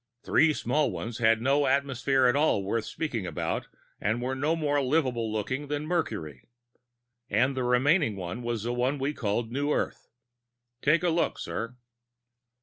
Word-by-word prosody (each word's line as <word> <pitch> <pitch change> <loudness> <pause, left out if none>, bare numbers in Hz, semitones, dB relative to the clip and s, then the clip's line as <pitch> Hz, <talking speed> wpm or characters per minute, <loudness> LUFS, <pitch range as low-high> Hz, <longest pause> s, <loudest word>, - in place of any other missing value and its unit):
Three 160 -1 +4
small 150 0 +1
ones 105 +6 -5
had 115 0 +3
no 140 +2 +3
atmosphere 135 -1 +2
at 125 - +4
all 145 -9 +2
worth 110 +3 -1
speaking 120 - -3
about, 85 - -3 0.3
and 110 +4 0
were 125 +2 -2
no 150 +5 0
more 145 -3 +1
livable 130 -5 0
looking 130 +7 -2
than 145 +1 -2
Mercury. 105 - -3 0.8
And 130 +6 +2
the 130 - -1
remaining 125 - +3
one 95 +5 -5
was 120 -3 -2
the 120 +1 -1
one 125 +4 0
we 140 +2 -1
call 110 -3 -1
New 140 +6 -2
Earth. - - -2 0.7
Take 165 +4 +3
a 175 - +3
look, 165 +1 +1
sir." 115 +2 -4
130 Hz, 160 wpm, -28 LUFS, 115-145 Hz, 0.8 s, Three